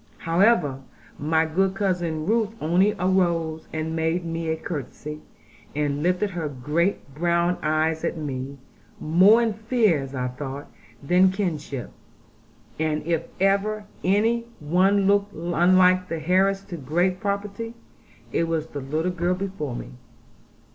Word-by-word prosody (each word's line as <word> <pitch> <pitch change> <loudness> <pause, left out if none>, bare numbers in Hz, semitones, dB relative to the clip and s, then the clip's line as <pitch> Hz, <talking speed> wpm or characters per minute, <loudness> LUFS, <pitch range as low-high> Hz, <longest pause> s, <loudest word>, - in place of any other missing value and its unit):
However, 165 - +2 0.4
my 160 +2 +2
good 190 +4 +1
cousin 175 -6 -1
Ruth 220 +2 +1
only 180 +6 +3
arose, 170 -4 0
and 160 +1 -3
made 165 +2 0
me 165 0 -3
a 160 - 0
curtsey, 150 -1 -6 0.6
and 145 -1 -1
lifted 180 +4 +1
her 165 -4 -3
great 150 +4 -1
brown 170 +3 +1
eyes 155 +1 0
at - - -1
me, 140 -2 -5 0.4
more 190 +9 +5
in 225 -2 0
fear, 220 - +2
as 135 0 -7
I 125 -1 -1
thought, 135 +2 -7 0.3
than 180 +5 +5
kinship. 155 - -3 0.9
And 155 -1 0
if 165 -1 -1
ever 200 +2 +1 0.2
any 225 +5 +2
one 185 +6 +3
looked 200 +1 +2
unlike 180 +2 +3
the 160 -1 -5
heiress 195 +2 +3
to 190 -3 -7
great 175 +6 0
property, 205 +3 -3 0.6
it 165 - +1
was 165 -2 -1
the 145 - -6
little 155 +6 -1
girl 180 +1 0
before 185 -9 -4
me. - - -7
170 Hz, 135 wpm, -24 LUFS, 155-195 Hz, 0.9 s, more